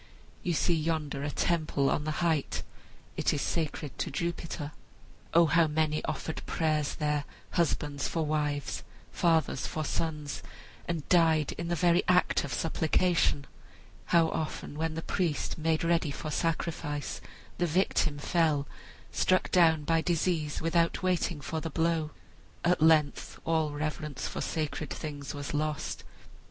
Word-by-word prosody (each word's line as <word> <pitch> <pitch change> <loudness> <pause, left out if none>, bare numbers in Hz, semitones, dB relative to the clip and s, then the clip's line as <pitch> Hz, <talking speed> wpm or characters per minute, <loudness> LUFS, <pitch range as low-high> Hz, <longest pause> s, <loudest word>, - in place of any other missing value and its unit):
You 175 - 0
see 170 +2 +2
yonder 155 -3 -1
a 145 - -1
temple 155 -3 +1
on 150 - 0
the 155 +3 -1
height. 160 -4 0 0.5
It - - +2
is 145 - -1
sacred 150 -6 -2
to - - -1
Jupiter. 165 -1 -3 0.6
O 170 0 +6
how 165 +1 +4
many 155 0 0
offered 160 - -3
prayers 155 -3 0
there, 150 -1 0 0.3
husbands 150 -4 0
for 165 -2 -1
wives, 150 -2 -1 0.3
fathers 160 -5 +2
for 155 -1 -3
sons, 150 -6 -2 0.5
and 165 -4 -3
died 160 -4 +4
in 170 - -5
the 175 - 0
very 175 +1 +4
act 180 0 +3
of 140 - -5
supplication! 160 0 +1 0.6
How 165 -1 +4
often, 155 -2 -4
while 160 +2 0
the 160 +1 -5
priest 170 -4 -1
made 160 0 +1
ready 165 -2 +2
for 150 +2 -5
sacrifice, 160 -2 -2 0.4
the 175 - +2
victim 160 -3 +1
fell, 150 -2 +1 0.4
struck 185 0 +2
down 160 -4 +5
by 165 +2 +2
disease 165 -3 0
without 170 +2 +2
waiting 175 -4 0
for 160 +3 -3
the 165 - -3
blow! 160 0 +1 0.6
At 175 -2 +3
length 155 -2 +3
all 160 -2 +2
reverence 150 -2 -3
for - - -4
sacred 155 -2 -2
things 145 0 -5
was 145 0 -5
lost. 150 0 -2
160 Hz, 145 wpm, -30 LUFS, 150-170 Hz, 0.6 s, O